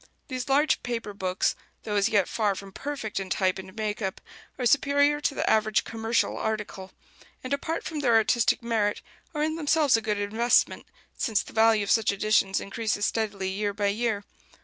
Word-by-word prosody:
These 255 0 -4
large 290 +3 +3
paper 230 -4 -4
books, 185 -2 0 0.3
though 210 - -3
as 200 +1 +3
yet 200 -4 +2
far 210 -3 0
from 195 +1 -9
perfect 270 -3 -4
in 190 -1 -5
type 185 0 +1
and 190 +1 -10
make 215 -1 -3
up, 190 -2 -3 0.4
are 250 - -2
superior 285 +2 +3
to 285 - 0
the - - -1
average 215 -1 +3
"commercial 225 +1 -1
article"; 210 -3 -4 0.5
and, 255 +2 -3
apart 315 +3 -2
from 315 -2 -4
their 245 -5 +3
artistic 225 +1 +3
merit, 220 -3 0 0.3
are 300 - 0
in 315 +1 -1
themselves 300 -3 +3
a 225 - +1
good 210 -2 -1
investment, 220 +4 +1 0.3
since 220 -5 0
the - - -13
value 220 -1 +4
of 200 - -1
such 225 -3 +3
editions 200 -1 +2
increases 210 0 -2
steadily 205 -4 -1
year 205 +1 -2
by 205 -1 +1
year. 215 -1 -1
220 Hz, 185 wpm, -26 LUFS, 205-245 Hz, 0.5 s, value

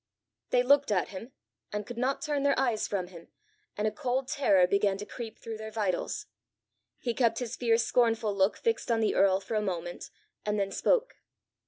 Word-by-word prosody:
They 245 - +3
looked 280 0 +4
at 190 -3 +1
him, 205 +6 -8 0.4
and 210 0 -3
could 240 +1 -7
not 265 +5 0
turn 295 -3 0
their 280 0 +2
eyes 235 -5 +1
from 185 -3 -2
him, 170 -2 -12 0.5
and 210 +1 +1
a - - 0
cold 260 -1 -2
terror 195 -11 +4
began 200 +1 +2
to 205 - -6
creep 230 -1 -7
through 225 -1 -7
their 220 0 -7
vitals. 205 -5 -2 0.7
He 240 - -2
kept 230 -2 +2
his 245 -1 -3
fierce 230 -1 +2
scornful 225 -4 +2
look 195 +1 +2
fixed 455 - -1
on 230 -1 +2
the 220 - +2
earl 190 -1 +4
for 200 - -7
a 215 - +2
moment, 175 -3 -4 0.3
and 210 0 -1
then 195 0 -1
spoke. - - +1
220 Hz, 195 wpm, -29 LUFS, 200-250 Hz, 0.7 s, looked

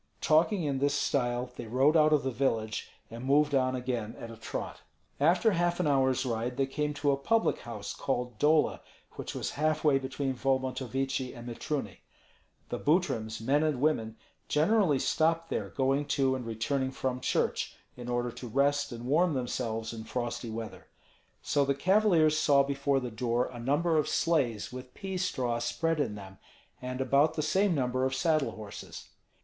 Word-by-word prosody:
Talking 170 +5 +3
in 140 -3 -1
this 140 +1 +1
style, 125 -3 0
they 115 - -7
rode 135 +7 +3
out 155 -1 +5
of 150 -2 +3
the 130 - -1
village 115 -4 -1 0.2
and 115 +2 -7
moved 145 +2 +3
on 130 -1 +2
again 125 -3 -3
at 115 - -7
a - - -9
trot. - - -6 0.4
After 175 +9 +4
half 175 -1 0
an 180 - +1
hour's 130 -2 +2
ride 120 +1 -2
they 135 - +2
came 150 +2 -2
to 145 0 +1
a - - +3
public 225 +11 +1
house 110 -4 -6
called 125 -4 -3
Dola, 155 +1 +3 0.3
which - - -7
was - - -3
half 155 +1 0
way 145 -3 +4
between 135 0 -3
Volmontovichi 130 0 -1
and 120 +1 -9
Mitruny. 135 +4 -4 0.7
The - - -3
Butryms, 135 - 0
men 140 +6 +2
and 155 -5 0
women, 115 -7 0 0.3
generally 165 0 +3
stopped 165 +4 +1
there - - -2
going 135 +2 +1
to 135 -1 +2
and 125 -3 -5
returning 130 +4 -1
from 130 -1 -3
church, - - 0 0.2
in 120 -1 -8
order 120 0 -1
to 125 - -8
rest 140 +4 +1
and 120 0 -7
warm 155 +4 +2
themselves 115 -3 -3
in 110 -1 -7
frosty 120 -1 -3
weather. 110 0 -7 0.6
So 145 - +2
the 140 0 +1
cavaliers 170 -2 +3
saw 140 -2 +5
before 140 0 0
the 125 -2 -5
door 120 +2 0
a 120 - -8
number 150 +7 +1
of 150 - 0
sleighs 125 -10 0
with 125 0 -9
pea 195 -2 -4
straw 125 -9 -1
spread 165 +7 -1
in 110 -8 -1
them, 95 -1 -11 0.4
and 125 +1 -4
about 140 +4 +3
the 155 - -1
same 190 +3 +2
number 130 -1 0
of 130 0 0
saddle 155 +1 +1
horses. 105 -2 -9
135 Hz, 175 wpm, -30 LUFS, 120-150 Hz, 0.7 s, out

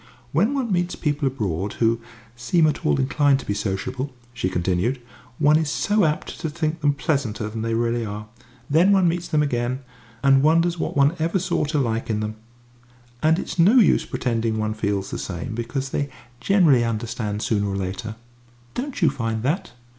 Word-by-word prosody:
"When 210 - +2
one 255 -5 -1
meets 175 -1 0
people 145 -2 -1
abroad 100 -7 -2
who 115 0 +2
who - - -22 0.3
seem 160 +7 +2
at 155 - 0
all 75 - +2
inclined 140 +1 +3
to - - -12
be 100 - -1
sociable," 105 +7 -3 0.2
she 105 -6 -1
continued, 90 +9 0 0.4
"one 150 +1 +5
is 155 -2 0
so 205 +5 +2
apt 150 -1 -2
to 160 - -2
think 155 +2 -2
them 145 -1 +2
pleasanter 130 -7 -1
than 110 +1 -5
they 115 0 -1
really 115 0 0
are. 105 0 -5 0.4
Then 170 +7 +4
one 190 -2 +4
meets 170 +1 -1
them 150 -2 +2
again, 130 -1 -1 0.4
and 135 -1 +6
and - - +3
wonders 165 +2 +3
what - - -2
one 140 +4 +4
ever 165 +4 +1
saw 180 -4 0
to 150 +1 -1
like 115 -4 -1
in 110 -1 0
them. 110 0 -4 0.8
And 160 +1 +4
it's 180 - -5
no 190 +9 +6
use 240 -5 +5
pretending 115 -2 -1
one 110 0 -1
feels 100 -2 -2
the - - -4
same, 100 +7 -5
because 125 +4 -3
they 140 +1 -2 0.3
generally 165 -11 +4
understand 110 -2 -3
sooner 105 -2 +1
or 100 - -2
later. 100 +4 -4 0.6
Don't 255 -5 -4
you 155 - +5
find 115 -5 -3
that?" 145 - -1
130 Hz, 190 wpm, -23 LUFS, 110-160 Hz, 0.8 s, and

